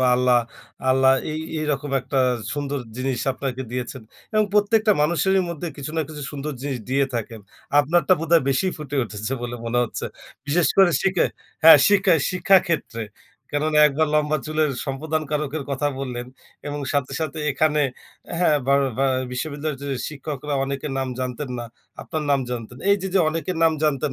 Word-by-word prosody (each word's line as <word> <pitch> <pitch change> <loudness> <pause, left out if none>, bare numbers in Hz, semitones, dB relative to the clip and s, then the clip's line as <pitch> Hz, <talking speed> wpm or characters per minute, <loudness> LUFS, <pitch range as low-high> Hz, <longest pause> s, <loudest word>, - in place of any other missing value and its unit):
বা 130 - +4
আল্লাহ, 125 -1 +4 0.5
আল্লাহ, 130 0 +5 0.2
এই 155 - -3 0.2
এইরকম 145 -2 -2
একটা 135 +2 -2 0.3
সুন্দর 145 -1 -2 0.2
জিনিস 130 -1 -2
আপনাকে 130 -1 -4
দিয়েছেন। 125 0 -5 0.3
এবং 215 0 +3
প্রত্যেকটা 210 +1 +4
মানুষেরই 185 +4 +2
মধ্যে 170 0 -5
কিছু 145 +1 -5
না - - +2
কিছু 150 -2 -7
সুন্দর 145 +1 -4
জিনিস 135 -3 -3
দিয়ে 140 +1 +3
থাকেন। 115 -1 -4 0.4
আপনারটা 170 +6 +2
বোধহয় 165 -2 +3
বেশি 135 +8 +2
ফুটে 145 -2 -5
উঠেছে 110 +3 -5
বলে 120 0 -4
মনে 115 +1 0
হচ্ছে। - - -5 0.4
বিশেষ 160 +4 +3
করে 190 -3 +7
শিখে 185 -2 +2 0.4
হ্যাঁ 160 -2 +10
শিক্ষা, 195 -3 +4 0.2
শিক্ষা, 185 +1 +4
ক্ষেত্রে 145 -9 -2 0.5
কেননা 150 +1 +1
একবার 155 +2 +1
লম্বা 150 0 +2
চুলের 155 -1 +1
সম্প্রদানকারকের 150 +1 -2
কথা 140 +2 0
বললেন 125 -2 -4 0.4
এবং 145 0 -4
সাথে, 140 -2 0
সাথে, 160 0 -3
এখানে 150 +2 +2 0.6
হ্যাঁ 165 -4 +4
বা 140 - +4 0.2
বা 135 - +3 0.3
বিশ্ববিদ্যালয়ের 145 +1 -3
যে 140 - -4 0.2
শিক্ষকরা 150 -1 -5
অনেকের 140 +1 -4
নাম 130 - -1
জানতেন 125 +2 -4
না। 120 - -4 0.4
আপনার 155 - -4
নাম 140 -1 +3
জানতেন। 120 0 -6
এই 200 - +6
যে, 190 - -2
যে, 195 - +5
অনেকের 165 +2 -3
নাম 165 - +5
জানতেন 145 -1 +1
145 Hz, 165 wpm, -23 LUFS, 135-155 Hz, 0.6 s, হ্যাঁ